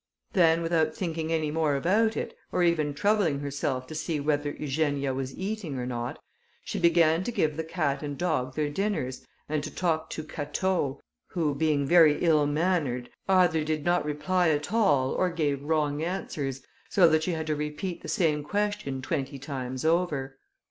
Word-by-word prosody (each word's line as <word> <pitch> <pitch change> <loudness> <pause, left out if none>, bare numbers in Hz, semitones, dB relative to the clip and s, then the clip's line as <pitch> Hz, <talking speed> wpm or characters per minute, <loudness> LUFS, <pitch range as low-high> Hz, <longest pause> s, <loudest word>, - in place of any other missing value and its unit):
Then, 165 -1 +4
without 160 -2 +1
thinking 165 -3 -3
any 155 -2 0
more 155 -2 +1
about 210 +10 +2
it, - - -4 0.2
or 180 - +1
even 155 -4 +1
troubling 200 -3 +2
herself 140 -2 -2
to 145 - -9
see 155 0 -2
whether 145 0 0
Eugenia 145 -2 -1
was 130 0 -4
eating 190 -7 -3
or 125 - -3
not, 120 -1 -4 0.5
she - - -3
began 170 -1 +4
to 240 - -2
give 155 -10 0
the 160 - -2
cat 155 -4 -1
and 145 -2 -5
dog 130 -8 -1
their 150 -1 0
dinners, 165 -8 -2 0.2
and 150 -1 -1
to - - -4
talk 160 -3 -1
to 155 - -5
Catau, 150 -1 -2 0.3
who, 160 -5 +1
being 145 -1 +1
very 160 -1 +6
ill 155 -4 +4
mannered, 145 -6 0 0.2
either 180 -4 +4
did 155 -1 -2
not 175 0 +2
reply 165 +4 +1
at 150 +5 -1
all 145 - +3
or 185 - +1
gave 150 -5 -1
wrong 150 -1 0
answers, 145 -6 -3 0.3
so 185 -4 +6
that 160 -1 +3
she 175 +2 -1
had 160 -1 -3
to 155 -1 0
repeat 150 +4 -4
the - - -8
same 155 -4 +1
question 205 -7 -2
twenty 140 -1 -2
times 130 -1 -5
over. 150 -6 0
155 Hz, 175 wpm, -27 LUFS, 145-170 Hz, 0.5 s, very